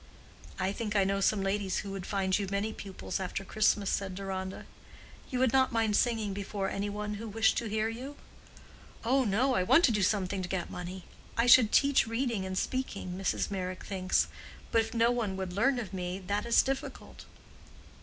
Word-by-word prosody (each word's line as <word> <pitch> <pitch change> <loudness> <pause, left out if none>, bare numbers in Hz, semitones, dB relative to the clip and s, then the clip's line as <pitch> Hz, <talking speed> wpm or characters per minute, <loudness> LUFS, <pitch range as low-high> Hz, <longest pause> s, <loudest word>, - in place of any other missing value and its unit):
"I 190 0 0
think 210 0 -4
I 200 - +5
know 195 +1 0
some 195 0 +2
ladies 195 0 -1
who 200 - -7
would 195 -2 -6
find 190 -1 +1
you 200 - -2
many 200 +3 -1
pupils 195 -2 -5
after 190 +1 -4
Christmas," 210 -1 +2
said 195 -2 -2
Deronda. 190 -1 -5 0.6
"You 255 - -2
would 255 -1 +2
not 265 -1 +4
mind 225 -3 +1
singing 220 -4 +1
before 195 0 -3
any 200 +1 -2
one 210 +1 -4
who 230 - -5
wished 220 +1 +3
to 235 - -4
hear 215 +1 0
you?" 255 +6 -6 0.9
"Oh 260 +3 +3
no, 235 +6 +2
I 185 - +2
want 325 - +5
to 245 - +3
do 210 -2 +1
something 195 -1 +1
to 180 - -5
get 185 -3 -3
money. 180 +1 -6 0.3
I 230 +1 +3
could 245 -3 +7
teach 280 -4 +4
reading 230 -4 -1
and 185 0 -4
speaking, 235 -6 -2
Mrs. 195 +1 -1
Meyrick 185 -1 -4
thinks. 185 -2 +1 0.4
But 225 - +4
if 225 +1 -6
no 230 +1 +4
one 220 -6 -1
would 190 -2 -4
learn 250 +7 +2
of 210 -6 -5
me, 180 0 -3
that 200 +4 -2
is 235 - +5
difficult." 270 0 -5
205 Hz, 195 wpm, -30 LUFS, 190-230 Hz, 0.9 s, could